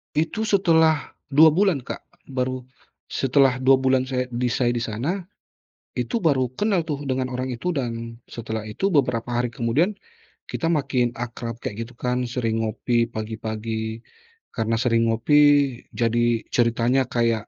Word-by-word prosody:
Itu 165 +8 0
setelah 160 -6 +3 0.2
2 160 +2 +8
bulan, 175 -3 +2
Kak. - - -7 0.2
Baru 130 0 -2 0.5
setelah 135 -1 +3
2 130 +1 +5
bulan 130 0 +2
saya 125 -1 -2
di 125 +1 -1
saya 120 0 +1
di 120 - -1
sana 120 - -2 0.7
itu 235 - -1
baru 130 -5 +3
kenal 205 -4 +2
tuh 145 -1 -3
dengan 130 -1 -1
orang 130 +1 -3
itu 180 +10 -2
dan 115 -6 -3
setelah 110 -2 -5
itu 125 - -1
beberapa 125 - +1
hari 120 0 0
kemudian 130 - +1 0.6
kita 165 - -1
makin 135 -6 +1
akrab 120 -1 -5
kek 105 - -4
gitu 115 +1 -6
kan. 125 0 -1
Sering 115 -3 -1
ngopi 115 +2 0
pagi-pagi, 110 0 -4 0.5
karena 115 -1 -1
sering 115 -1 +2
ngopi 120 +7 +3 0.6
jadi 115 0 +1
ceritanya 120 +2 +2
kayak 115 -3 0
125 Hz, 145 wpm, -23 LUFS, 115-140 Hz, 0.7 s, 2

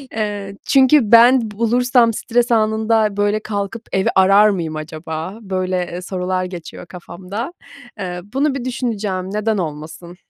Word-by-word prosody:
Eee, 205 -2 -4
çünkü 270 +2 +5
ben 240 +2 +7
bulursam 235 +2 +2
stres 240 +2 0
anında, 220 -1 +1
böyle, 205 +1 +1
"Kalkıp 210 +1 -5
evi 190 - +1
arar 195 +3 +6
mıyım 170 -6 -3
acaba?" 160 +5 -6
böyle, 185 -2 -2 0.2
eee, 175 - -5
sorular 185 0 -2
geçiyor 180 -1 -9
kafamda. 185 - -7 0.5
Eee, 180 -2 -5
bunu 275 +1 +1
bir 255 -3 -5
düşüneceğim, 205 -7 -3
neden 215 +1 0
olmasın? 160 +1 -6
205 Hz, 135 wpm, -18 LUFS, 185-230 Hz, 0.5 s, ben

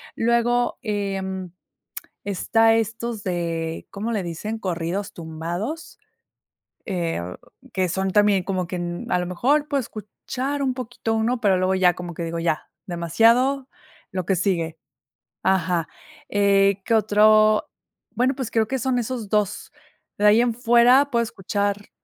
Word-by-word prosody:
Luego, 235 +1 +1
em, 195 -3 -3 0.7
está 225 +3 +3
estos 225 0 -2
de, 165 -3 -3
¿cómo 215 +4 -3
le 215 -4 0
dicen? 210 +7 -5
Corridos 185 +2 -3
tumbados, 170 - -5 0.9
eh, 170 - -2
o 90 +1 -7 0.3
que 185 -1 0
son 190 +2 -1
también 205 -1 +4
como 185 -2 -2
que, 180 +1 -4
mm 175 0 -5
,a 180 - +3
lo 180 - -3
mejor 280 +12 +1
puede 280 -2 0
escuchar 250 +6 -5
un 260 -2 0
poquito 245 -3 -3
uno, 230 +2 0
pero 195 -4 +3
luego 185 +1 +1
ya 180 -2 +4
como 175 0 -7
que 170 - -4
digo: 165 0 -3
"Ya 165 -2 -1 0.2
demasiado 230 - +2 0.4
lo 185 -2 -3
que 195 - +2
sigue". 170 -4 -1 0.7
Ajá, 175 -3 +1 0.4
eh, 200 -1 +3
¿qué 230 - +1
otro?, 215 0 +4 0.4
bueno, 250 +4 +1
pues, 255 -4 -4
creo 225 -1 +2
que 265 - -1
son 250 0 0
esos 235 -3 -4
2 210 -2 -1 0.5
de 210 - +2
ahí 215 +3 +6
en 240 -1 +1
fuera 245 +4 +5
puedo 235 -1 +2
escuchar 205 -1 -2
205 Hz, 145 wpm, -23 LUFS, 180-235 Hz, 0.9 s, ahí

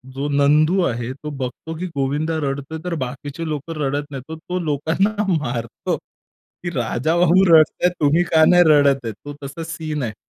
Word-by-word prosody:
जो 140 +2 -2
नंदू 150 +6 +3
आहे 120 +1 -2
तो 150 +3 -8
बघतो 130 +5 -5
की 180 - -4
गोविंदा 145 +4 -1
रडतोय, 140 +2 -3
तर 180 -1 -3
बाकीचे 140 +5 -6
लोकं 150 +2 -4
रडत 145 +1 -2
नाहीत. 135 +3 -8 0.2
तो 180 0 -1
लोकांना 160 +7 0 0.2
मारतो 120 -7 -2
की 175 - -13
राजाबाबू 165 +10 +2
रडत 155 -1 +7
आहेत, 180 - +4
तुम्ही 155 +4 +3
का 160 -1 +6
नाही 175 0 +7
रडत 140 -4 +4
आहे? 115 - -2
तो 145 +8 -10
तसा 145 +4 -6
सीन 155 -3 -4
आहे. 110 -2 -4
145 Hz, 170 wpm, -21 LUFS, 135-165 Hz, 0.2 s, रडत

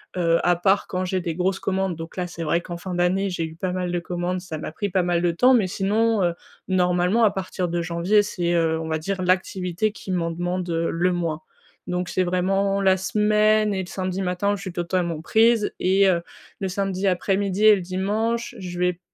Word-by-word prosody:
heu, 170 -2 +2
à 175 - +4
part 190 +3 +2
quand 185 0 -2
j'ai 185 0 -1
des 170 -2 -3
grosses 190 +2 0
commandes 190 -2 -1
donc 165 +2 -9
là, 180 -1 -2
c'est 170 -1 -6
vrai 170 +2 +1
qu'en 175 -1 -7
fin 180 +1 -6
d'année, 185 +3 +1
j'ai 170 -2 -2
eu 160 - -11
pas 180 +2 -3
mal 180 -1 -2
de 175 - 0
commandes, 175 +1 -3
ça 180 -4 -6
m'a 155 - -5
pris 200 +6 -3
pas 185 0 +1
mal 175 -1 +1
de 175 - +3
temps, 250 +10 +4
mais 220 -6 +3
sinon, 210 +3 +1
heu, 175 -1 +1 0.3
normalement 180 +3 +2
à 215 - +5
partir 185 -1 -3
de 170 0 -1
janvier, 170 +5 +2
c'est, 175 -4 -2
heu, 160 -1 +1
on 160 - -5
va 160 0 -1
dire 190 +3 -3
l'activité 185 +2 0
qui 200 -2 -8
m'en 170 -2 0
demande, 175 +1 -3
heu, 165 0 0
le 175 +2 +1
moins. 165 -3 -2 0.5
Donc 180 0 -2
c'est 185 - +1
vraiment 195 +2 +1
la 190 -1 +4
semaine 210 +2 +2
et 190 - -1
le 180 - -10
samedi 185 0 -3
matin, 190 +3 0
je 200 - -9
suis 190 -3 -5
totalement 170 -2 -1
prise 225 +3 +3
et 195 +2 +3
heu, 170 -2 +2 0.4
le 195 - -2
samedi 195 0 -1
après-midi 195 +2 +1
et 215 - +9
le 190 - -4
dimanche, 215 +7 -2
je 175 -1 -6
vais 180 0 +2
p 175 - -23
185 Hz, 225 wpm, -23 LUFS, 175-195 Hz, 0.5 s, et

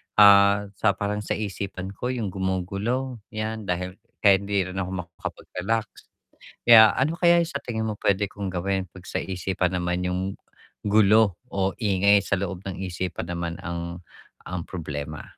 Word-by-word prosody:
ah, 100 0 +6
sa 100 -3 +3
parang 105 +1 -2
sa 105 - -2
isipan 100 -2 -5
ko 120 +5 -5
yung 115 -7 -2
gumugulo, 100 +7 -2 0.2
yan 110 -1 -3
dahil 90 +1 -3 0.2
kahit 100 -1 +6
hindi 100 -2 +1
rin 95 - -4
ako 90 -1 -3
makakapag-relax. 105 +5 -4 0.8
Kaya, 110 -2 +9
ano 145 +5 +2
kaya 170 0 +4
yung 165 - -2
sa 140 - -3
tingin 110 -2 -3
mo 110 - -1
pwede 100 0 +2
kong 100 -1 -5
gawin, 95 0 -2
'pag 95 +1 -14
sa - - -3
isipan 90 0 -1
naman 90 0 -1
yung 90 +1 -1 0.6
gulo 105 -2 +4 0.2
o 95 0 0
ingay 100 -2 +4
sa - - -1
loob 95 0 -4
ng 95 -1 -5
isipan 90 -1 -4
naman 85 -1 -3
ang 85 +1 -5 0.4
ang 90 -2 -5
problema. 75 -3 -5
95 Hz, 160 wpm, -25 LUFS, 90-105 Hz, 0.8 s, Kaya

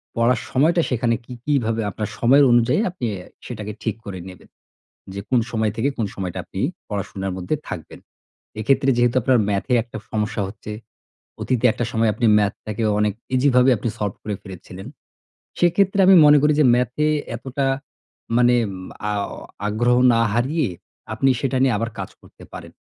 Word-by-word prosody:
পড়ার 115 +2 +2
সময়টা 160 +6 +3
সেখানে 120 -1 +1
কি 125 - -9
কীভাবে 115 -6 0
আপনার 105 +1 -4
সময়ের 135 +4 +5
অনুযায়ী 120 - +3
আপনি 180 -10 -5
অ্যা 90 -1 -10 0.2
সেটা 110 -4 -6 0.2
ঠিক 110 - -1
করে 95 -2 -6
নিবেন। 90 - -15 0.6
যে 100 - -5
কোন 125 - +3
সময় 110 -2 0
থেকে 130 +5 +1
কোন 110 - 0
সময়টা 95 -3 -4
আপনি 95 - -8 0.3
পড়াশোনার 95 -2 -4
মধ্যে 90 +12 -2
থাকবেন। 80 - -8 0.6
এক্ষেত্রে 135 +5 +2
যেহেতু 120 0 +2
আপনার 125 +1 +3
ম্যাথে 100 +5 -1
একটা 120 -2 -9
সমস্যা 110 0 -1
হচ্ছে, 105 +1 -9 0.7
অতীতে 125 -2 0
একটা 120 - -3
সময় 115 -1 +2
আপনি 120 - -1
ম্যাথটাকে 105 +1 -2 0.2
অনেক 105 -1 +1 0.2
ইজিভাবে 125 -1 +4
আপনি 110 +3 -3
সল্ভ 100 -2 -2
করে 105 -2 -3
ফেলেছিলেন। 95 +1 -10 0.7
সেক্ষেত্রে 195 +3 +2
আমি 190 - +8
মনে 150 0 +7
করি 150 0 +3
যে, 150 - +5
ম্যাথে 125 +5 0 0.3
এতটা 135 +3 -3 0.7
মানে 125 0 +4 0.6
আও 100 -1 -2 0.4
আগ্রহ 120 +4 +2 0.2
না 115 - +3
হারিয়ে 135 +7 0 0.5
আপনি 135 +5 +2
সেটা 135 -1 0
নিয়ে 130 -4 +3
আবার 115 +2 -2
কাজ - - -4
করতে - - -17
পারেন। - - -9
120 Hz, 160 wpm, -21 LUFS, 105-130 Hz, 0.7 s, আমি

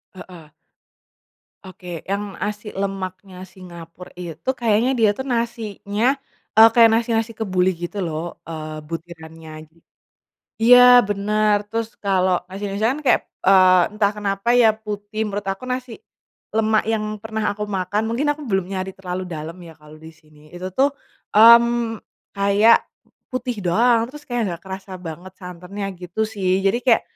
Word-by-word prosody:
Heeh. 170 -5 -13 1.1
Oke 180 -3 -9
yang 200 0 -3
nasi 210 +1 -4
lemaknya 195 -1 -5 0.2
Singapura 175 -1 -12
itu 175 - -7
kayaknya 230 +1 +2
dia 215 -2 +5
tuh 265 - -5
nasinya, 225 -2 -3 0.5
eee, 225 +1 +9
kayak 230 -1 +7
nasi-nasi 230 0 0
kebuli 185 -4 +1
gitu 175 - -5
loh, 160 -1 -3 0.3
eee, 155 -1 -6
butirannya 165 -1 -9 0.2
jadi, 165 +1 -28 0.8
iya 245 +2 +8 0.3
bener 210 +1 +1
terus 230 0 -2 0.2
kalo 190 -2 +2 0.2
nasi-nasi 200 +2 -4
kan 285 - -4
kayak, - - +4 0.3
eee, 185 -2 +6 0.2
entah 205 -1 +2
kenapa 200 +2 -2
ya 225 - +6 0.2
putih 210 0 -6
menurut 205 -1 -5
aku 195 - -17
nasi, 255 -1 -4 0.7
lemak 220 -1 +2
yang 220 - 0 0.2
pernah 220 -1 -4
aku 210 +1 -5
makan 195 +1 -2
mungkin 265 +6 -1
aku 295 - -7
belum 190 -2 0
nyari 190 0 -3
terlalu 185 -1 -5
dalam 160 +3 -7
ya 165 - -12
kalo 150 0 -14
disini 155 -1 -17
itu 180 +1 -6
tuh, 275 +2 +4 0.4
mmm, 235 +1 +6 0.4
kayak, 200 +3 +5 0.6
putih 250 -2 -3
doang 230 +6 +3
terus 295 +4 -11
kayak 245 -1 -2
gak 170 - -17
kerasa 190 +1 -8
banget 175 +4 -8
santannya 180 +3 -8 0.2
gitu 180 +4 -5
sih 190 -3 -2 0.2
jadi 200 +5 +3
kayak, 235 -3 +4
200 Hz, 145 wpm, -21 LUFS, 180-225 Hz, 1.1 s, eee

